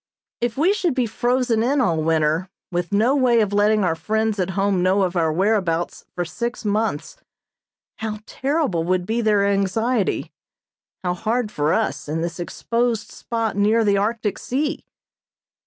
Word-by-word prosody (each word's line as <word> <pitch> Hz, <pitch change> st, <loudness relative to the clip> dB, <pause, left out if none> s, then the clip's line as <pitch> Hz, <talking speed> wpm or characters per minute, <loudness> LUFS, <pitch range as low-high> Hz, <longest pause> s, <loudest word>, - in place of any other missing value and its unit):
If 240 Hz, 0 st, -2 dB
we 340 Hz, +8 st, +4 dB
should 355 Hz, -9 st, 0 dB
be 255 Hz, -2 st, +2 dB
frozen 240 Hz, 0 st, +1 dB
in 270 Hz, +5 st, +2 dB
all 165 Hz, -11 st, +2 dB
winter, 160 Hz, +2 st, +1 dB, 0.2 s
with 175 Hz, -1 st, -2 dB
no 225 Hz, +7 st, +3 dB
way 250 Hz, -4 st, +4 dB
of 205 Hz, -2 st, +1 dB
letting 210 Hz, +1 st, +3 dB
our 175 Hz, -3 st, +2 dB
friends 215 Hz, +6 st, -1 dB
at 185 Hz, 0 st, 0 dB
home 195 Hz, -2 st, +2 dB
know 190 Hz, +2 st, +3 dB
of 185 Hz, -1 st, -1 dB
our 165 Hz, -2 st, +2 dB
whereabouts 180 Hz, -2 st, 0 dB
for 175 Hz, -, -1 dB
six 235 Hz, +6 st, -4 dB
months, 210 Hz, -6 st, -1 dB, 0.8 s
how 220 Hz, -1 st, -4 dB
terrible 270 Hz, -, -1 dB
would 180 Hz, +1 st, 0 dB
be 225 Hz, +4 st, 0 dB
their 210 Hz, -3 st, +3 dB
anxiety, 200 Hz, +3 st, 0 dB, 0.7 s
how 180 Hz, -1 st, 0 dB
hard 220 Hz, +4 st, -1 dB
for 150 Hz, -4 st, 0 dB
us -, -, -1 dB
in 160 Hz, +2 st, -1 dB
this 170 Hz, +1 st, -4 dB
exposed 230 Hz, +5 st, -1 dB
spot 230 Hz, -3 st, -3 dB
near 215 Hz, +3 st, +3 dB
the 200 Hz, -1 st, +3 dB
Arctic 210 Hz, 0 st, -1 dB
Sea! 295 Hz, +5 st, -2 dB
210 Hz, 160 wpm, -22 LUFS, 180-235 Hz, 0.8 s, we